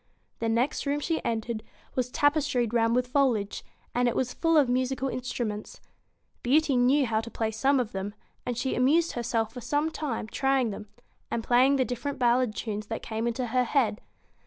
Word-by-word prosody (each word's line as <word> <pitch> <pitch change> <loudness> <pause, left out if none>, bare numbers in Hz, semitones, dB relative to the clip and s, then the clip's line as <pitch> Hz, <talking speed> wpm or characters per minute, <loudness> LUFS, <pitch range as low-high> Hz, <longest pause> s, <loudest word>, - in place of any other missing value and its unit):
The 230 - 0
next 240 +5 0
room 285 +1 +1
she 320 +2 -1
entered 225 -1 -2 0.3
was 250 -1 -1
tapestried 290 -5 +1
round 230 0 +3
with 250 0 +2
foliage, 250 -6 +1 0.3
and 245 0 +2
it 240 - 0
was 250 -1 -1
full 330 -1 +2
of 285 -4 +5
musical 260 +2 0
instruments. 240 -4 -4 0.6
Beauty 285 +2 +3
knew 260 +3 +4
how 220 -2 0
to 230 - -8
play 225 -1 -2
some 265 +5 +2
of 240 -4 -2
them; 195 +2 -4 0.3
and 245 -2 -3
she 260 +2 -1
amused 310 +7 +3
herself 225 -2 -1
for 250 - -7
some 290 +6 0
time 275 -9 -3
trying 265 0 +1
them, 210 +1 -8 0.4
and 230 - -2
playing 255 +4 +4
the 260 -2 +2
different 250 +3 -4
ballad 245 -2 +2
tunes 210 -2 -4
that 225 - -4
came 225 +1 -2
into 235 +2 -1
her 250 +2 +1
head. 230 -5 +1
245 Hz, 185 wpm, -28 LUFS, 225-270 Hz, 0.6 s, of